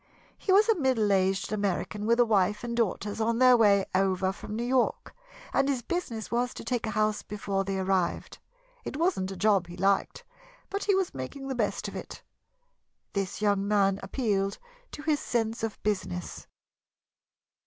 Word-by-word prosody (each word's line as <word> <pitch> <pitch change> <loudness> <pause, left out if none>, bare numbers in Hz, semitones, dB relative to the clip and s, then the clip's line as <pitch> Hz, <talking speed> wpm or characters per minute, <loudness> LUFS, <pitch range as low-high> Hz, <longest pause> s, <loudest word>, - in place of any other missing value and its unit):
He 390 - -2
was 410 +3 +6
a 450 -6 +3
middle 235 -7 +2
aged 190 0 +1
American 205 +1 -2
with 235 +1 +3
a 240 - +6
wife 210 -1 +2
and 235 -1 -3
daughters 210 -1 -1
on 230 +1 +1
their 255 0 +7
way 205 -4 +4
over 190 0 +2
from 210 - -7
New 235 - -2
York, 255 0 0 0.4
and 275 - +2
his 260 -4 -1
business 240 -9 -4
was 245 +1 0
to - - -7
take 245 -3 -2
a 215 -1 -3
house 215 0 +1
before 200 -1 -3
they 195 0 -2
arrived. 190 -2 -1 0.4
It 270 - -5
wasn't 330 - +1
a 195 - -6
job 200 -3 +3
he 175 +1 -10
liked, 195 +1 +1 0.5
but 400 0 -2
he 405 - +3
was 380 -2 0
making 270 - -6
the - - -1
best 225 -5 -1
of - - -8
it. - - -8 0.9
This 195 +1 -3
young 200 -1 +2
man 200 -2 +2
appealed 195 -2 -1 0.4
to 295 - -7
his 305 -2 +1
sense 225 -2 -1
of 225 -1 -3
business. 190 - -3
210 Hz, 175 wpm, -28 LUFS, 195-245 Hz, 0.9 s, their